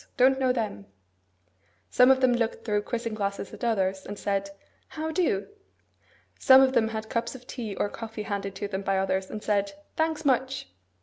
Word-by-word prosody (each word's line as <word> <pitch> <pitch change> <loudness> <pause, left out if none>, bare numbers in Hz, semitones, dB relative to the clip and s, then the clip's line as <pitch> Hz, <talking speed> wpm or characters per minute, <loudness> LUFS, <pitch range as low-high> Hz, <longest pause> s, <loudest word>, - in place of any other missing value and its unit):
Don't 265 +1 +5
know 260 -1 +3
them.' 215 - -3 1.0
Some 250 +1 +6
of 265 0 +5
them 255 -1 +4
looked 230 -2 -1
through 210 -2 +1
quizzing 230 +1 -3
glasses 200 -2 -3
at - - -10
others, 195 -4 0
and 205 - -7
said, 200 -1 -1 0.4
'How 315 0 -4
do?' 315 - 0 0.9
Some 265 -1 +8
of 265 0 +2
them 220 -3 +3
had 220 0 -4
cups 230 +3 -2
of 250 -1 -12
tea 225 -6 -5
or - - 0
coffee 225 0 -7
handed 200 -2 -4
to 205 - -3
them 195 -1 -3
by 195 -1 0
others, 190 0 0
and 210 - -6
said, 200 -1 0 0.2
'Thanks; 320 -1 0
much! 260 - 0
220 Hz, 185 wpm, -27 LUFS, 200-255 Hz, 1.0 s, Some